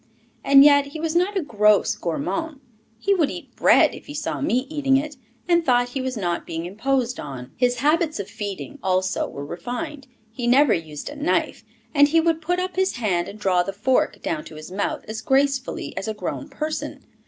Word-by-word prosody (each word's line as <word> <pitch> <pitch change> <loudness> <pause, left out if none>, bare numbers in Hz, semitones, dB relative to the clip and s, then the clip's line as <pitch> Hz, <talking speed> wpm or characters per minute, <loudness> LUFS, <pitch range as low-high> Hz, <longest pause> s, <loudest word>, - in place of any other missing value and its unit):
And 275 0 +8
yet 285 -1 +6
he 310 +3 -8
was 325 +1 -2
not 375 +4 +2
a 375 - 0
gross 210 -5 +3
gourmand; 295 - -3 0.4
he 400 +12 +1
would 330 -7 +2
eat - - -9
bread - - +5
if - - -11
he 290 - -8
saw 300 +1 -3
me 255 -2 +1
eating 275 -3 +2
it, 295 +1 -3 0.3
and 340 -1 +3
thought 245 -3 +2
he 265 +2 -3
was 255 -2 -3
not 175 -4 -1
being 165 +1 -4
imposed 250 +6 -1
on. 130 -3 -7
His 245 -1 +1
habits 310 0 +2
of 200 - -4
feeding, 205 +8 -6
also, 185 0 0
were 140 - -7
refined; 245 - -6 0.2
he 240 +1 -4
never 265 +1 +5
used 155 -3 -5
a 290 - -8
knife, 290 +2 -1 0.3
and 285 -1 +6
he 325 +3 +3
would 325 0 +1
put 355 +3 0
up 370 0 -3
his 380 0 +2
hand 190 -8 0
and 205 - -9
draw 185 -4 +2
the 195 +2 -4
fork 250 +6 0
down 155 -2 -2
to 155 - -11
his 155 +3 -10
mouth 195 +2 -2
as 220 0 -5
gracefully 270 0 0
as 195 - -4
a 220 - -3
grown 285 +7 -5
person. 305 +3 -4
260 Hz, 205 wpm, -23 LUFS, 200-300 Hz, 0.4 s, And